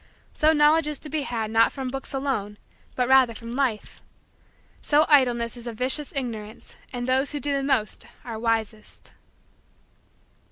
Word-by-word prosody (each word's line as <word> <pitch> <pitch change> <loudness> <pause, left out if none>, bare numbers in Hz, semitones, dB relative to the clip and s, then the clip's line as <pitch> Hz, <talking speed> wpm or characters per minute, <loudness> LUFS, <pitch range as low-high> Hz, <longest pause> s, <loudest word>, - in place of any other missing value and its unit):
So 310 +1 +3
Knowledge 305 +1 +4
is 300 -1 -2
to 300 - -6
be 310 0 -2
had 225 -5 -3
not 225 0 +4
from 265 -2 -5
books 270 +1 -6
alone 265 -7 -3 0.4
but 250 -1 0
rather 260 -3 +4
from 230 +1 -8
Life. 245 -4 -2 0.8
So 300 +1 +3
idleness 245 -6 +3
is 240 0 -10
a 235 - -4
vicious 260 +5 +2
ignorance 225 -5 -6 0.2
and 245 -1 -4
those 265 +3 +1
who 290 - -2
do 285 0 -1
the 275 - 0
most 260 -6 -1 0.2
are 230 -3 -6
wisest. 225 -1 -3
255 Hz, 160 wpm, -24 LUFS, 230-280 Hz, 0.8 s, Knowledge